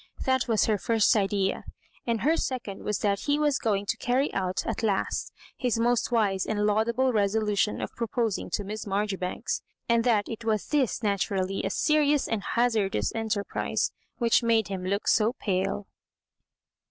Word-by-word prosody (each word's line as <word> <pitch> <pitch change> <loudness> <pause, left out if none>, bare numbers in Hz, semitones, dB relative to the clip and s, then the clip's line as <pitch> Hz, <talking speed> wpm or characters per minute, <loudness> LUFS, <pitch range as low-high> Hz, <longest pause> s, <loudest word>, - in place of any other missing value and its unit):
That 260 -1 +2
was 225 -3 +3
her 215 -2 +1
first 225 +1 +3
idea, 195 -2 0 0.4
and 230 -2 0
her 310 +4 +3
second 245 -10 -3
was 210 - -1
that 200 -1 +1
he 290 0 0
was 295 -2 +2
going 205 -3 0
to - - -1
carry 255 +4 0
out 185 -1 -1
at - - -2
last 205 -4 -1 0.2
his 245 -3 0
most 240 +1 +1
wise 205 -5 +2
and 210 -1 0
laudable 230 +5 +2
resolution 210 0 +1
of - - -5
proposing 230 -2 -1
to 205 - 0
Miss 210 +2 -5
Maijoribanks, 195 -2 -2 0.3
and 235 0 +3
that 220 -4 +2
it 230 0 -6
was 220 -2 -1
this, 265 -6 +1
naturally 195 -1 0
a - - 0
serious 295 +4 +2
and 225 -3 -1
hazardous 220 -2 +1
en 225 -1 -3
terprise, 200 -1 -1 0.3
which 235 -2 +3
made 225 -3 +2
him 190 -2 -4
look 200 +3 -2
so 220 +2 +3
pale. 195 -3 -2
215 Hz, 165 wpm, -27 LUFS, 200-235 Hz, 0.4 s, was